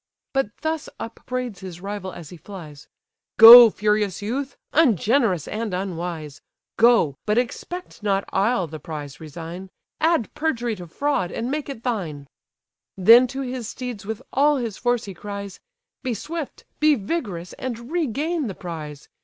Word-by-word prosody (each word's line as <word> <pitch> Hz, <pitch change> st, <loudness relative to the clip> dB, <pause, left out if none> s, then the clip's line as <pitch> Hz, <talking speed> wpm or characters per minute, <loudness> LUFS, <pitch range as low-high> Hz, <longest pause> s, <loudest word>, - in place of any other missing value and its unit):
But 270 Hz, -6 st, +1 dB
thus 315 Hz, -1 st, -2 dB
upbraids 245 Hz, -2 st, -5 dB
his 180 Hz, -2 st, -8 dB
rival 195 Hz, 0 st, -5 dB
as 165 Hz, -3 st, -10 dB
he 175 Hz, -, -10 dB
flies: 160 Hz, -4 st, -11 dB, 0.5 s
"Go, 230 Hz, +1 st, +12 dB
furious 210 Hz, -2 st, 0 dB
youth! 260 Hz, +7 st, -4 dB, 0.2 s
ungenerous 230 Hz, -, +3 dB
and 215 Hz, -3 st, -3 dB
unwise! 170 Hz, -5 st, -5 dB, 0.3 s
Go, 230 Hz, -, +4 dB
but 210 Hz, +1 st, +2 dB
expect 300 Hz, +7 st, -4 dB
not 200 Hz, -1 st, 0 dB
I'll 205 Hz, 0 st, +2 dB
the 155 Hz, -1 st, -8 dB
prize 150 Hz, -2 st, -7 dB
resign; 165 Hz, +4 st, -8 dB, 0.3 s
Add 320 Hz, -7 st, +1 dB
perjury 245 Hz, -7 st, -1 dB
to 175 Hz, -1 st, -9 dB
fraud, 195 Hz, -, -1 dB
and 240 Hz, +3 st, -3 dB
make 295 Hz, -1 st, -3 dB
it 235 Hz, -5 st, -7 dB
thine—" 170 Hz, -, -3 dB, 0.7 s
Then 230 Hz, +7 st, +7 dB
to 270 Hz, +2 st, -5 dB
his 250 Hz, -3 st, -4 dB
steeds 245 Hz, -5 st, -6 dB
with 220 Hz, +1 st, -5 dB
all 290 Hz, +2 st, +4 dB
his 230 Hz, -5 st, -3 dB
force 245 Hz, +1 st, 0 dB
he 195 Hz, -, -7 dB
cries, 200 Hz, 0 st, -7 dB, 0.4 s
"Be 250 Hz, -3 st, -2 dB
swift, 315 Hz, -, -6 dB
be 305 Hz, 0 st, +5 dB
vigorous, 200 Hz, -, -4 dB
and 240 Hz, +1 st, -5 dB
regain 315 Hz, -1 st, -1 dB
the 195 Hz, -, -5 dB
prize! 155 Hz, -5 st, -8 dB
215 Hz, 150 wpm, -23 LUFS, 180-255 Hz, 0.7 s, Go